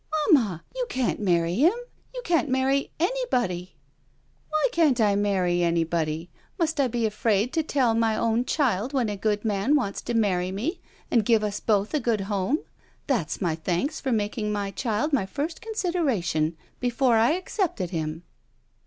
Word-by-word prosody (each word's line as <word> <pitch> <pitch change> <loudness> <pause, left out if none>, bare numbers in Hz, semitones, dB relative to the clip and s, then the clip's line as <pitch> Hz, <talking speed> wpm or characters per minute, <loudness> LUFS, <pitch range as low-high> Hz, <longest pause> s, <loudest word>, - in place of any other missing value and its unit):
"Mamma 210 - +3
— - - -34
you - - -2
can't 255 -2 -1
marry 170 -4 +1
him. 310 - +4 0.4
You - - -7
can't 330 -4 +2
marry 265 +2 +1
— - - -40
^anybody." 250 - -1 0.8
"Why 310 +8 +2
can't 305 - +3
I 205 -3 +3
marry 190 -4 +1
anybody? 165 -1 0 0.3
Must 320 -4 0
I 275 - +4
be 235 -1 -1
afraid 215 +2 +1
to 325 - +2
tell 270 -6 +1
my 225 -1 +2
own 230 +2 +1
child 255 - 0
when 250 -5 +1
a 205 - -2
good 210 +1 -1
man 210 +7 +2
wants 205 -9 -1
to 240 - -3
marry 185 -5 +1
me 275 - -3 0.3
and 230 -3 +4
give 225 0 +3
us 205 -1 -2
both 210 +1 +1
a 305 - +2
good 230 -5 0
home? 200 - -1 0.4
That's 225 - -1
my 175 -4 +1
thanks 175 - -2
for 265 - -1
making 210 -1 -1
my 200 -1 -2
child 225 - -1
my 225 -9 +2
first 295 - -4
con^dera 350 - -1
tion 160 -1 0
— - - -37
^before 245 0 +2
I 235 +7 +4
accepted 355 - -2
him." 160 -1 -3
225 Hz, 180 wpm, -25 LUFS, 195-280 Hz, 0.8 s, him